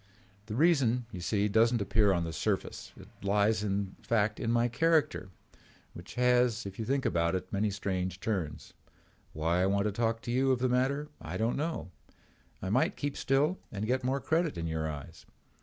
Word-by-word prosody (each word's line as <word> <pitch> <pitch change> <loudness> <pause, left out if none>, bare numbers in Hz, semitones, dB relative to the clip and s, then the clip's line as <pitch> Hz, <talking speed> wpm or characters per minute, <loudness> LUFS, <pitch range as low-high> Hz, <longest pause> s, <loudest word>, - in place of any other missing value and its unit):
The 105 - -4
reason, 130 -6 +3
you 90 -5 -7
see, 100 +3 +1
does 115 +3 +4
not 120 - +1
appear 100 0 +3
on 85 -3 +1
the 80 -1 -4
surface. - - -2
It - - -12
lies 105 +2 +2
in 100 -1 -2
fact 110 -2 +1
in 115 - -1
my 120 0 +3
character, 120 - +1 0.6
which 85 +2 -11
has, 125 -2 +3
if 100 +1 -8
you 110 - -2
think 135 +3 0
about 85 -4 +1
it, 95 - -5
many 105 +2 +1
strange 95 -2 -3
turns. 95 -8 -3 0.6
Why 85 +3 +1
I 95 - +3
want 100 +1 +2
to 105 - 0
talk 115 +2 -1
to 120 - -3
you 130 +2 +2
of 130 - +3
the 125 +1 0
matter 135 +4 +1
I 85 +3 -5
don't 115 +3 0
know. 155 - -3 0.7
I 95 - -2
might 160 - +2
keep 145 -1 -2
still 145 +7 +1
and 105 +1 -3
get 130 +3 0
more 130 +2 0
credit 160 - 0
in 85 - -3
your 80 -1 -2
eyes. 70 -3 -9
110 Hz, 195 wpm, -30 LUFS, 95-130 Hz, 0.7 s, does